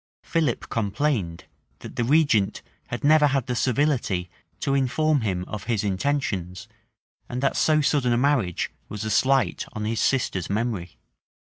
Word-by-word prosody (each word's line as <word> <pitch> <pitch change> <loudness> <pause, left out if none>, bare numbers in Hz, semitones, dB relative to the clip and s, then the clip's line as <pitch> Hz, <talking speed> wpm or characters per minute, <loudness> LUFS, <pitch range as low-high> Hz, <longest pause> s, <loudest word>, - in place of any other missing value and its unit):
[] - - -82
Philip 155 -8 +1
complained, 105 - -1 0.4
that - - -9
the - - 0
regent 125 -7 +2 0.2
had 120 - -5
never 150 0 +6
had 135 -3 0
the 125 - -2
civility 120 - 0 0.3
to 135 - 0
inform 140 +2 +2
him 90 -4 -2
of 105 -3 -6
his 110 -3 0
intentions, 100 -3 -2 0.6
and 125 - -3
that 135 - +2
so 155 -1 +3
sudden 145 -4 +2
a 120 - +3
marriage 125 - +1 0.2
was 105 +1 -5
a 110 - -2
slight 130 -5 +2
on 105 0 -4
his 110 0 -1
sister's 115 -9 0
memory. 100 -4 -2
120 Hz, 155 wpm, -24 LUFS, 100-140 Hz, 0.6 s, never